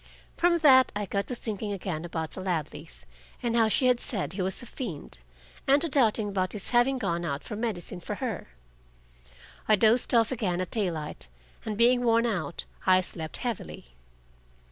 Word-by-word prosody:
From 345 Hz, 0 st, +3 dB
that 260 Hz, -2 st, +7 dB
I 205 Hz, 0 st, -2 dB
got 200 Hz, +1 st, -2 dB
to 250 Hz, -, -3 dB
thinking 215 Hz, -2 st, -4 dB
again 175 Hz, -4 st, -4 dB
about 160 Hz, -2 st, -4 dB
the 190 Hz, -, -7 dB
Ladleys, 165 Hz, -3 st, -4 dB, 0.4 s
and 235 Hz, -1 st, 0 dB
how 225 Hz, -2 st, +4 dB
she 255 Hz, -, +2 dB
had 250 Hz, -1 st, +4 dB
said 200 Hz, -8 st, -3 dB
he 190 Hz, -, -3 dB
was 190 Hz, +5 st, -1 dB
a -, -, -8 dB
fiend, 170 Hz, -, -7 dB, 0.5 s
and 275 Hz, +2 st, +5 dB
to -, -, +1 dB
doubting 225 Hz, -7 st, +2 dB
about 185 Hz, -2 st, -1 dB
his 205 Hz, -3 st, -4 dB
having 250 Hz, +2 st, +3 dB
gone 175 Hz, -7 st, -2 dB
out 145 Hz, -4 st, -3 dB
for 215 Hz, -, -6 dB
medicine 205 Hz, -5 st, -4 dB
for 205 Hz, +4 st, -5 dB
her. 235 Hz, -3 st, -4 dB, 1.2 s
I 215 Hz, -, +6 dB
dozed 230 Hz, +4 st, +4 dB
off 230 Hz, 0 st, +4 dB
again 195 Hz, -8 st, -1 dB
at 185 Hz, -, -3 dB
daylight, 165 Hz, -, -3 dB, 0.4 s
and 210 Hz, -2 st, -3 dB
being 245 Hz, +2 st, +4 dB
worn 230 Hz, 0 st, +3 dB
out, 175 Hz, -9 st, -3 dB, 0.2 s
I 185 Hz, 0 st, +6 dB
slept 160 Hz, -3 st, -5 dB
heavily. 220 Hz, -, -5 dB
210 Hz, 180 wpm, -27 LUFS, 175-240 Hz, 1.2 s, that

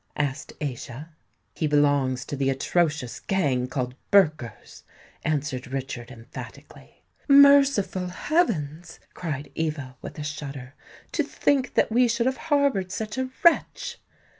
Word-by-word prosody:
asked 140 Hz, -2 st, -2 dB
Aischa. 135 Hz, +1 st, -5 dB, 0.4 s
"He 155 Hz, -, -1 dB
belongs 145 Hz, -3 st, +2 dB
to -, -, -4 dB
the 135 Hz, -1 st, 0 dB
atrocious 150 Hz, -1 st, 0 dB
gang 140 Hz, -10 st, 0 dB
called 125 Hz, -1 st, -3 dB, 0.2 s
Burkers," 155 Hz, -, +1 dB, 0.4 s
answered 145 Hz, -5 st, -2 dB
Richard 130 Hz, -2 st, -5 dB
emphatically. 115 Hz, 0 st, -12 dB, 0.2 s
"Merciful 275 Hz, -, +6 dB
heavens!" 175 Hz, -, -1 dB
cried 145 Hz, -5 st, -5 dB
Eva, 145 Hz, -5 st, -3 dB
with -, -, -8 dB
a 150 Hz, -, -4 dB
shudder. 140 Hz, -3 st, -6 dB, 0.4 s
"To -, -, +1 dB
think 270 Hz, -3 st, 0 dB
that -, -, +3 dB
we 245 Hz, +2 st, +4 dB
should 235 Hz, 0 st, 0 dB
have 260 Hz, 0 st, +1 dB
harboured 280 Hz, -, +2 dB
such 215 Hz, +4 st, -4 dB
a 260 Hz, 0 st, -1 dB
wretch!" 340 Hz, -, +2 dB
150 Hz, 125 wpm, -25 LUFS, 135-215 Hz, 0.4 s, Merciful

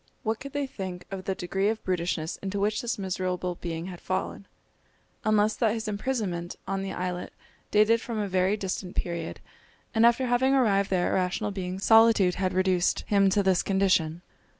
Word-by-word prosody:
What 220 Hz, 0 st, -1 dB
could 275 Hz, 0 st, -9 dB
they 285 Hz, -1 st, -1 dB
think 190 Hz, -8 st, -6 dB
of 190 Hz, -1 st, -6 dB
the 190 Hz, -, -1 dB
degree 195 Hz, +3 st, 0 dB
of 220 Hz, 0 st, -3 dB
brutishness 170 Hz, -3 st, -2 dB
into 195 Hz, +1 st, -4 dB
which 205 Hz, +1 st, 0 dB
this 240 Hz, 0 st, -2 dB
miserable 185 Hz, -2 st, -2 dB
being 165 Hz, -1 st, -4 dB
had 180 Hz, -2 st, -8 dB
fallen, 190 Hz, +1 st, -3 dB, 0.8 s
unless 215 Hz, 0 st, +3 dB
that 225 Hz, -2 st, +2 dB
his 225 Hz, -1 st, -4 dB
imprisonment 200 Hz, -6 st, -2 dB
on 195 Hz, 0 st, -1 dB
the 195 Hz, 0 st, -4 dB
islet 180 Hz, 0 st, -4 dB, 0.4 s
dated 215 Hz, +2 st, +4 dB
from 235 Hz, -3 st, -5 dB
a 210 Hz, -1 st, -1 dB
very 190 Hz, +2 st, +1 dB
distant 190 Hz, -2 st, -4 dB
period, 170 Hz, -2 st, -3 dB, 0.5 s
and 225 Hz, -, +3 dB
after 235 Hz, +2 st, +4 dB
having 255 Hz, +2 st, +3 dB
arrived 200 Hz, -6 st, +3 dB
there 180 Hz, -2 st, +1 dB
a -, -, 0 dB
rational 190 Hz, +3 st, 0 dB
being 185 Hz, -2 st, -4 dB
solitude 225 Hz, -2 st, +5 dB
had 185 Hz, 0 st, -1 dB
reduced 185 Hz, -1 st, +2 dB
him 200 Hz, -1 st, +3 dB
to 200 Hz, +1 st, +2 dB
this 190 Hz, -2 st, +3 dB
condition. 185 Hz, -4 st, +1 dB
195 Hz, 180 wpm, -27 LUFS, 180-215 Hz, 0.8 s, solitude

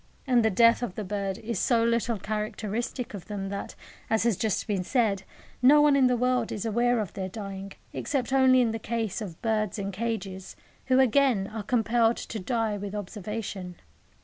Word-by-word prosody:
And 250 Hz, -4 st, +3 dB
the 220 Hz, -, +4 dB
death 230 Hz, +4 st, +5 dB
of 235 Hz, -7 st, -4 dB
the 215 Hz, -, -4 dB
birds 195 Hz, -1 st, -3 dB
is 225 Hz, -3 st, -4 dB
so 235 Hz, -2 st, +3 dB
little 235 Hz, 0 st, +1 dB
characteristic 215 Hz, +4 st, -3 dB
of 195 Hz, -4 st, -8 dB
them 195 Hz, -2 st, -4 dB
that, 200 Hz, 0 st, -5 dB, 0.3 s
as 220 Hz, 0 st, +2 dB
has 235 Hz, -3 st, +2 dB
just 215 Hz, 0 st, -1 dB
been 200 Hz, -4 st, -1 dB
said, 210 Hz, -3 st, +1 dB, 0.4 s
no 280 Hz, +4 st, +7 dB
one 295 Hz, -1 st, +5 dB
in 265 Hz, -2 st, +5 dB
the 250 Hz, -1 st, +2 dB
world 250 Hz, -1 st, +1 dB
is 210 Hz, -, -4 dB
aware 240 Hz, +2 st, +2 dB
of 205 Hz, -5 st, -3 dB
their 190 Hz, -1 st, -4 dB
dying, 195 Hz, -1 st, -7 dB, 0.2 s
except 270 Hz, -2 st, -2 dB
only 260 Hz, -1 st, +5 dB
in 235 Hz, -2 st, +2 dB
the 225 Hz, -, -3 dB
case 225 Hz, -2 st, -3 dB
of 180 Hz, -6 st, -7 dB
birds 215 Hz, -2 st, 0 dB
in 200 Hz, -1 st, -3 dB
cages, 195 Hz, -3 st, -4 dB, 0.3 s
who, 260 Hz, 0 st, +4 dB
again, 260 Hz, -5 st, +3 dB
are 220 Hz, -, -3 dB
compelled 230 Hz, +1 st, +2 dB
to 220 Hz, -, -5 dB
die 225 Hz, 0 st, -1 dB
with 205 Hz, +1 st, -5 dB
observation. 205 Hz, -2 st, -5 dB
220 Hz, 190 wpm, -27 LUFS, 200-240 Hz, 0.4 s, no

